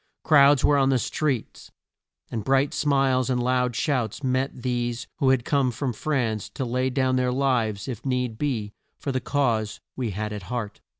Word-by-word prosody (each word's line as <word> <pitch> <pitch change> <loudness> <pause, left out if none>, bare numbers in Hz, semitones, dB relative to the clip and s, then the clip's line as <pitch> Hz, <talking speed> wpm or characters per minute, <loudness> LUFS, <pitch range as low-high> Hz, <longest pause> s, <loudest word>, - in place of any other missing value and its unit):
Crowds 145 -3 +6
were 145 -1 +4
on 135 0 +3
the 135 - +3
streets, 130 +1 -2 0.6
and 110 -3 -3
bright 135 +4 +2
smiles 135 -3 +2
and 125 -1 +1
loud 125 -1 +1
shouts 130 -2 -1
met 130 -1 -1
these 120 -1 -2
who 135 -4 +2
had 130 -2 +2
come 140 -3 +2
from 125 +1 -3
France 115 -5 -1
to 130 - -4
lay 125 +2 0
down 130 0 +1
their 125 0 +1
lives 120 -6 0
if 120 -3 -5
need 125 -4 -1
be 115 -8 -2 0.3
for 140 - -3
the 130 -1 -1
cause 115 -8 0 0.2
we 125 -3 -2
had 105 +2 -4
at 105 - -5
heart. 115 -4 -4
125 Hz, 180 wpm, -25 LUFS, 115-135 Hz, 0.6 s, Crowds